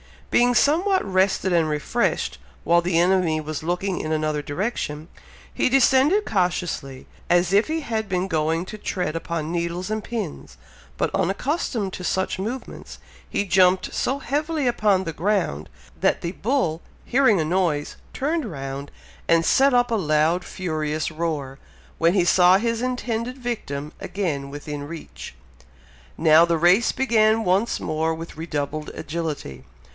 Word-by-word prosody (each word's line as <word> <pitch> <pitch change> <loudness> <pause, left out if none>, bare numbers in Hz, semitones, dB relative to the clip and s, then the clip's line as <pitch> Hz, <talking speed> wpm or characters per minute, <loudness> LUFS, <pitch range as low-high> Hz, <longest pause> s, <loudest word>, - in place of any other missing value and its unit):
Being 245 0 +4
somewhat 350 - +3
rested 190 0 +1
and 165 -3 +2
refreshed, 155 +10 -1 0.2
while 170 0 +4
the 175 -1 0
enemy 175 -3 +2
was 155 0 -5
looking 180 +3 -1
in 155 - -2
another 155 -1 -1
direction, 150 -1 -4 0.4
he - - +1
descended 270 - +4
cautiously, 175 -8 -2 0.2
as 175 +1 +3
if 205 +3 +4
he 320 +1 -2
had 220 -6 -3
been 185 0 0
going 160 +1 0
to 215 - -7
tread 180 -5 -3
upon 165 -1 -3
needles 175 +3 -2
and 215 0 -1
pins; 215 -10 -6 0.4
but, - - -1
unaccustomed 200 - -1
to 180 - -6
such 190 +1 -1
movements, 235 +7 -6 0.3
he - - 0
jumped 185 0 +3
so 270 +2 -1
heavily 295 +2 -1
upon 210 -5 +2
the 165 -3 -4
ground, 170 - -1 0.3
that - - +2
the 170 - -3
bull 190 - -1 0.2
hearing 245 -6 +3
a - - -1
noise, 165 -4 0 0.2
turned 310 +2 -1
round, 140 -6 -6 0.4
and 165 0 +3
set 270 +7 +4
up 245 -1 +3
a - - +2
loud 160 -1 +1
furious 155 -3 -3
roar, 155 -5 -3 0.4
when 165 +1 +4
he 190 -3 +3
saw 180 +1 +6
his 230 +2 -1
intended 250 -1 -2
victim 155 - -4
again 150 -9 -3
within 145 0 -6
reach. 165 +1 -9 0.8
Now 160 +1 +6
the 170 -1 +1
race 180 +8 +4
began 225 -4 +2
once 195 +5 +1
more 160 +1 -1
with 165 -1 -9
redoubled 155 -2 -3
agility! 150 - -5
180 Hz, 145 wpm, -23 LUFS, 155-225 Hz, 0.8 s, saw